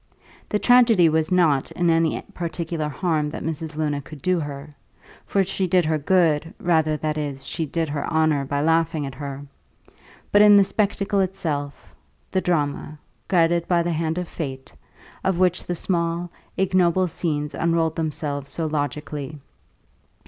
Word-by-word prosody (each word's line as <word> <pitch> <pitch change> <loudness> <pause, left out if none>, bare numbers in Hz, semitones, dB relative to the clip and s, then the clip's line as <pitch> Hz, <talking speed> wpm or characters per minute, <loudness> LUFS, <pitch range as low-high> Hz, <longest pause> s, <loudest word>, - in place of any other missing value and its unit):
The 210 - +1
tragedy 230 -7 +5
was 160 +2 0
not 160 -7 +3
in 175 -1 +2
any 165 -1 +2
particular 165 -2 -3
harm 155 -1 -1
that - - -6
Mrs. 160 -1 -4
Luna 150 -2 -1
could 140 +2 -11
do 185 +5 +1
her 145 -1 -6 0.5
(for 195 - +2
she 190 0 -1
did 180 -1 +3
her 155 0 +1
good, 165 -1 +2
rather, 160 -3 +2
that 155 0 -2
is, 140 -2 -5
she 160 - -3
did 165 +3 -1
her 145 -1 -3
honour 155 -3 +2
by 140 +1 -1
laughing 160 -1 +1
at 135 - -6
her), 140 +1 -7 0.9
but 205 - +6
in 210 -1 +8
the 200 - +7
spectacle 200 0 0
itself, 160 -7 -3 0.4
the 190 - +1
drama, 150 -3 -1 0.3
guided 170 -2 +2
by 175 -2 +2
the 175 - -1
hand 160 +1 -1
of 180 -1 -3
fate, 135 -7 -6 0.5
of 190 -2 +1
which 180 -1 +1
the 175 - -2
small, 170 0 -1 0.3
ignoble 185 -1 +2
scenes 150 -4 -2
unrolled 165 -1 +1
themselves 145 -3 -3
so 165 - -3
logically. 150 -1 -3
160 Hz, 155 wpm, -23 LUFS, 150-175 Hz, 0.9 s, in